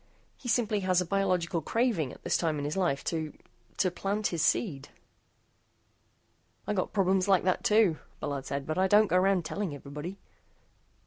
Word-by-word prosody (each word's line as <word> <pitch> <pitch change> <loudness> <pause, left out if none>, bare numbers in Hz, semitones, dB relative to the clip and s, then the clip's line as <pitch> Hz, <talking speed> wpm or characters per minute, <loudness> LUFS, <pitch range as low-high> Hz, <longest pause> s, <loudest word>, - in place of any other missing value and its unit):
He 250 - -11
simply 225 -3 +1
has 185 -2 +2
a 180 - 0
biological 180 -3 0
craving 215 - 0
at - - -14
this - - 0
time 160 -3 0
in 145 - -3
his 150 - -2
life 175 -8 0
to 160 -2 -3 0.4
to 185 - +2
plant 200 +4 -2
his 170 -3 -2
seed." 155 - 0 1.8
"I - - -1
got 185 -3 -1
problems 190 -1 +2
like 190 -3 +4
that, 185 0 +1
too," 210 -7 +4 0.2
Bullard 140 -2 -4
said, 140 0 -3
"but 155 +4 -2
I 190 - +4
don't 210 +3 +6
go 180 - +2
around 185 -2 +2
telling 185 -2 -3
everybody." 150 +7 -7
185 Hz, 175 wpm, -29 LUFS, 155-195 Hz, 1.8 s, don't